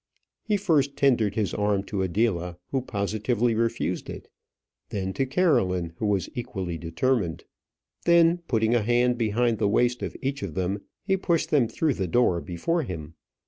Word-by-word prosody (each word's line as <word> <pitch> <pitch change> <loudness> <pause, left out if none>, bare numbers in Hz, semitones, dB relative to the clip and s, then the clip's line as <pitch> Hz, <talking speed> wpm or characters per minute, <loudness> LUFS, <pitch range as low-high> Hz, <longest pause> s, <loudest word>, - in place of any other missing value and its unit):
He 210 -2 0
first 145 -8 +1
tendered 120 -7 +2
his 105 -3 -1
arm 105 -1 +1
to 100 -1 -3
Adela, 90 -3 0
who 135 - 0
positively 110 +2 0
refused 115 +1 -1
it; - - -8 0.6
then 95 -2 -3
to 135 +4 -1
Caroline, 95 - +1
who 110 - -1
was 100 -3 +1
equally 95 -9 -4
determined. 85 +2 -1 0.6
Then, 170 0 +5
putting 110 -1 +2
a 120 - +3
hand 120 +2 +2
behind 115 0 +1
the 100 - +2
waist 120 +3 +2
of - - -4
each 140 +1 -3
of 80 -6 -5
them, 95 +2 -1 0.2
he 195 -1 +2
pushed 170 -3 0
them 135 -6 +4
through 155 +5 0
the 95 -5 -2
door 90 -4 +2
before 165 - -1
him. 80 - -6
115 Hz, 165 wpm, -26 LUFS, 95-135 Hz, 0.6 s, Then